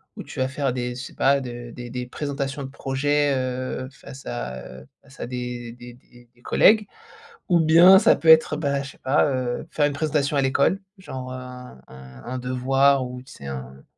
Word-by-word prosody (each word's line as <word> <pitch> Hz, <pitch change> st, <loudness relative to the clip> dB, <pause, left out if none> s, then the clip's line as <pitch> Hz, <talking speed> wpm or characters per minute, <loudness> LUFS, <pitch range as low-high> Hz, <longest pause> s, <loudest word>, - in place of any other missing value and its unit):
où -, -, -7 dB
tu -, -, -9 dB
vas 130 Hz, -, +1 dB
faire 135 Hz, -1 st, -1 dB
des 125 Hz, -1 st, -3 dB
je 125 Hz, -, -6 dB
sais -, -, -10 dB
pas, 140 Hz, +1 st, +3 dB
de 120 Hz, -2 st, -7 dB
des 120 Hz, 0 st, -8 dB
des 125 Hz, +1 st, -4 dB
présentations 140 Hz, +1 st, -4 dB
de 135 Hz, -, -6 dB
projets, 145 Hz, +2 st, 0 dB
heu, 130 Hz, 0 st, -3 dB
face 135 Hz, 0 st, -13 dB
à, 65 Hz, -, -5 dB, 0.2 s
heu, 65 Hz, -, -17 dB, 0.2 s
face 135 Hz, -1 st, -19 dB
à -, -, -4 dB
des 125 Hz, -1 st, -5 dB
des 120 Hz, 0 st, -12 dB
des 120 Hz, -1 st, -21 dB
des 120 Hz, -, -27 dB
collègues. 215 Hz, -, +4 dB, 0.6 s
Ou 175 Hz, -2 st, +4 dB
bien 170 Hz, +4 st, +8 dB
ça -, -, +5 dB
peut 165 Hz, -, 0 dB
être, 160 Hz, -1 st, +7 dB
bah, 140 Hz, -2 st, -1 dB
je 140 Hz, -, -8 dB
sais -, -, -20 dB
pas, 135 Hz, +3 st, +2 dB
heu, 130 Hz, 0 st, -2 dB
faire 150 Hz, -, +2 dB
une 145 Hz, -, 0 dB
présentation 145 Hz, -1 st, 0 dB
à -, -, +3 dB
l'école, 140 Hz, +8 st, +2 dB, 0.2 s
genre, 130 Hz, -9 st, -7 dB
heu, -, -, -5 dB
un 125 Hz, -, -10 dB
un 65 Hz, -1 st, -13 dB
un 130 Hz, +1 st, -4 dB
devoir 130 Hz, +2 st, +2 dB
ou, 125 Hz, 0 st, -7 dB
tu 130 Hz, -, -16 dB
sais, 70 Hz, -, -10 dB
un 65 Hz, 0 st, -8 dB
130 Hz, 215 wpm, -23 LUFS, 125-140 Hz, 0.6 s, bien